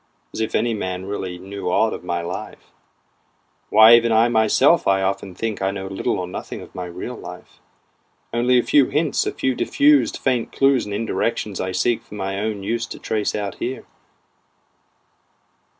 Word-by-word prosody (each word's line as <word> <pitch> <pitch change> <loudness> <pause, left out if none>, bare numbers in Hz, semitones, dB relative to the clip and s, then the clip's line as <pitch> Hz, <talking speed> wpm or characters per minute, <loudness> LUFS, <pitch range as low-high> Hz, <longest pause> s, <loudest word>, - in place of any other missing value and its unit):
(As - - -4
if 110 - -2
any 120 0 +1
man 95 -3 -4
really 95 -3 -4
knew 95 +1 -6
aught 110 +5 +2
of - - -7
my 85 -1 -2
life, 85 +1 -7 1.0
Why 110 +2 +8
even 115 0 +5
I 115 +2 +4
myself 120 +8 +3
I 95 0 +3
often 95 -1 -2
think 110 +1 -3
know 95 0 -2
little 95 0 -2
or 90 - -3
nothing 90 - -7
of - - -13
my 90 - -5
real 90 +8 -6
life, 90 -5 -11 0.7
Only 125 +2 +3
a 120 - +3
few 140 -3 +4
hints, 155 -1 0
a - - 0
few 130 - -1
diffused 290 - +3
faint 125 -4 -1
clews 135 -2 +2
and 105 - -6
indirections 110 -2 -2
I 95 - -2
seek 115 +6 0
for - - -13
my 95 -1 -3
own 105 -1 -3
use 115 +3 -2
to - - -8
trace 105 -2 -2
out 100 -2 -4
here.) 130 +2 -4
105 Hz, 175 wpm, -21 LUFS, 95-120 Hz, 1.0 s, Why